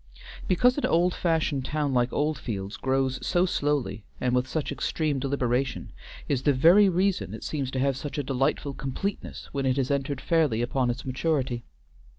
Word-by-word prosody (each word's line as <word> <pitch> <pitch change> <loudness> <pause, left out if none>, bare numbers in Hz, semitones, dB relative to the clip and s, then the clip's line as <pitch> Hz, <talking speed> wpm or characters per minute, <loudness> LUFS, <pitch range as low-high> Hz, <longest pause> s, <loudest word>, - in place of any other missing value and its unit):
Because 250 - +3
an - - 0
old 175 +2 +3
fashioned 160 -5 0
town 145 0 -1
like 125 0 +2
Oldfields 115 -10 -2
grows 130 0 0
so 175 +1 +2
slowly 145 - -1 0.2
and 125 -1 0
with 125 +1 +1
such 155 0 -2
extreme 150 -4 -1
deliberation, 130 -1 -1 0.4
is 135 -3 0
the 145 +1 +3
very 175 +10 +6
reason 185 +2 0
it - - -9
seems 140 -4 -2
to 130 - -4
have 135 0 +1
such 145 +3 -6
a 145 - 0
delightful 135 +2 0
completeness 135 +10 -5
when 135 -1 -1
it 130 +1 +1
has 135 0 0
entered 140 0 -1
fairly 150 -10 +1
upon 125 0 0
its 120 +1 -3
maturity. 130 -2 -1
140 Hz, 170 wpm, -27 LUFS, 130-155 Hz, 0.4 s, very